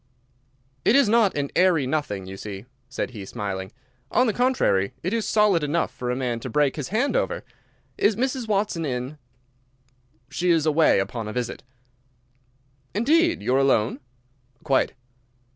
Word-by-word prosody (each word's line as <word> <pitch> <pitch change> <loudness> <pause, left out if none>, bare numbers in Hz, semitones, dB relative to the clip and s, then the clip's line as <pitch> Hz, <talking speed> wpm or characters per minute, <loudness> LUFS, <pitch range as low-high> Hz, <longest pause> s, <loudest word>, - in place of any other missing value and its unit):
"It 225 - +4
is 280 -4 +5
not 215 -5 +3
an 140 -1 -2
airy 180 -6 +4
nothing, 130 -10 -2
you 95 +1 -8
see," 100 +1 -7 0.2
said 125 - -3
he, 105 -5 -8
smiling. 95 -2 -5 0.4
"On 250 - +3
the 220 - +1
contrary, 240 - +1
it 185 +5 -1
is 230 -2 -1
solid 205 -6 +3
enough 150 +3 0
for 125 - -5
a 125 - 0
man 125 -3 -2
to 130 - -6
break 145 +2 +2
his 145 -4 -4
hand 245 - 0
over. - - -1 0.6
Is 210 - +3
Mrs. 255 +1 -2
Watson 200 -5 0
in?" 130 +1 -4 1.1
"She 180 +1 -1
is 165 -3 +3
away 155 +1 +4
upon 105 +3 -3
a 105 - -5
visit." 125 -2 -3 1.3
"Indeed! 330 +10 +2
You 125 - +1
are 135 - +4
alone?" 130 -3 +2 0.6
"Quite." 135 -4 +1
150 Hz, 160 wpm, -24 LUFS, -, 1.3 s, is